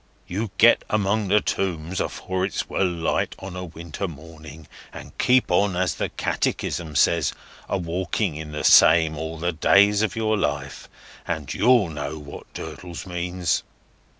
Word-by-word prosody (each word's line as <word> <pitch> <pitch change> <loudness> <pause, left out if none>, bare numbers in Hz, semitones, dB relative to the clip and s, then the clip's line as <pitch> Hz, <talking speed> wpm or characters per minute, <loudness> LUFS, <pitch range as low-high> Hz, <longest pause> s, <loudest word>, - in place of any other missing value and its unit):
You 105 +5 -3
get 120 +2 +6
among 105 0 +1
them 105 +2 +3
Tombs 90 -2 -2
afore 95 0 -3
it's 95 - -2
well 95 - +1
light 85 -2 -1
on 95 -1 -8
a 90 - -5
winter 85 +2 -6
morning, 80 -1 -12 0.2
and - - -11
keep 125 -5 +3
on, 95 +1 +2
as 90 0 +1
the - - -3
Catechism 80 -4 -2
says, 80 +1 +3 0.4
a - - 0
walking 90 +1 -2
in 75 0 -7
the 75 0 -4
same 80 -1 +6
all 80 +2 -5
the 85 +2 -1
days 100 +5 +4
of 110 -5 0
your 110 -1 +1
life, 70 -4 -3 0.4
and - - -3
you'll 120 -5 +4
know 75 0 -5
what 70 -1 -11
Durdles 85 -2 -7
means." 90 -1 -1
90 Hz, 155 wpm, -23 LUFS, 80-100 Hz, 0.4 s, get